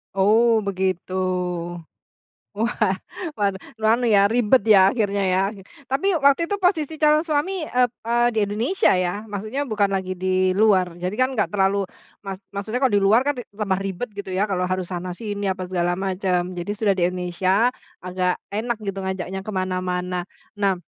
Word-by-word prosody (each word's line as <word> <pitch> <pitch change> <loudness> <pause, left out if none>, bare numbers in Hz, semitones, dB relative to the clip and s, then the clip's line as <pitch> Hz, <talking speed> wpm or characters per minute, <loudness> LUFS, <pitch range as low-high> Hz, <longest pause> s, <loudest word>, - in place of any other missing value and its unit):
Oh, 215 +5 +4 0.2
begitu. 185 -1 -2 1.4
Wah, 215 -2 0 0.5
waduh, 200 +4 -3
anu 240 +2 +3
ya 195 - +6
ribet 240 0 +3
ya 195 - +8
akhirnya 205 -4 0
ya. 185 - +3 0.5
Tapi 275 +9 0 0.2
waktu 280 +4 +5
itu 405 - -1
posisi 325 -4 +1
calon 305 +1 +4
suami, 305 +4 0
ep 250 -3 +2 0.2
eee, 240 +1 +3
di - - +2
Indonesia 230 - +1
ya? 180 -1 +1 0.2
Maksudnya 215 +8 -3
bukan 205 -2 +2
lagi 185 -1 -3
di 185 0 +1
luar. 190 -4 +3
Jadi 185 +3 -2
kan 255 +1 +3
nggak 210 - 0
terlalu 195 -1 +2 0.5
mak 195 -1 -4 0.2
maksudnya 215 +4 -3
kalau 255 - +3
di 200 - +4
luar 215 +5 +5
kan 290 - +2
tambah 200 -3 -3
ribet 195 +5 -4
gitu 200 -1 -7
ya 200 - +3
kalau 180 -2 -1
harus 185 -1 -1
sana-sini 195 +3 -4
apa 185 0 -2
segala 175 -1 -1
macam. 190 -1 0
Jadi 175 +3 -4
sudah 210 -3 +2
di 185 - -3
Indonesia, 185 +6 +1 0.3
agak 180 0 0 0.2
enak 230 +2 -1
gitu 195 0 -3
ngajaknya 190 0 -4
kemana-mana. 185 -2 -2 0.4
Nah 195 -2 +2
200 Hz, 160 wpm, -23 LUFS, 185-230 Hz, 1.4 s, ya